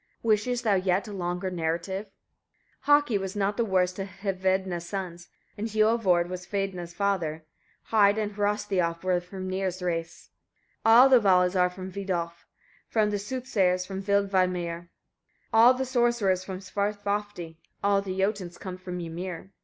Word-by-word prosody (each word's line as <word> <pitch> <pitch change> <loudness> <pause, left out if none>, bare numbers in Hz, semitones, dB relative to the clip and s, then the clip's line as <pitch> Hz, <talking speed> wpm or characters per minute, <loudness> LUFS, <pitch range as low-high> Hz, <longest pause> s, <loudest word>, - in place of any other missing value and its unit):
Wishest 230 +2 +1
thou 215 -3 +3
yet 185 +1 +1
a 210 - -7
longer 180 0 -3
narrative? 170 +4 -2 0.8
32. 290 - +1
Haki 290 -8 +4
was 190 0 -5
not 205 0 0
the 235 - +1
worst 185 -3 +1
of 195 - -3
Hvedna's 190 -2 -1
sons, 180 -3 -5 0.3
and 220 - -2
Hiorvard 215 -5 +2
was 180 0 -7
Hvedna's 195 -4 -3
father; 170 -5 -1 0.5
Heid 205 -1 +5
and 210 -1 -1
Hrossthiof 200 -5 -1
were 185 - 0
of 180 0 -1
Hrimnir's 185 -1 -3
race. 165 -2 -4 0.5
33. 225 - +5
All 245 +4 +9
the 255 -2 +7
Valas 180 -3 +3
are 180 -1 +3
from 185 +1 -8
Vidolf; 175 -3 -4 0.5
all 215 -1 +4
the 205 -1 -1
soothsayers 200 -6 0
from 195 0 -5
Vilmeidr, 185 -4 0 0.6
all 235 +3 +7
the 265 +1 -2
sorcerers 240 -7 +1
from 190 0 -6
Svarthofdi; 205 -3 -3 0.3
all 200 0 +3
the 190 -1 -5
Jotuns 190 -3 -1
come 185 -1 -7
from 180 -1 -6
Ymir. 175 +2 -6
190 Hz, 155 wpm, -27 LUFS, 180-205 Hz, 0.8 s, All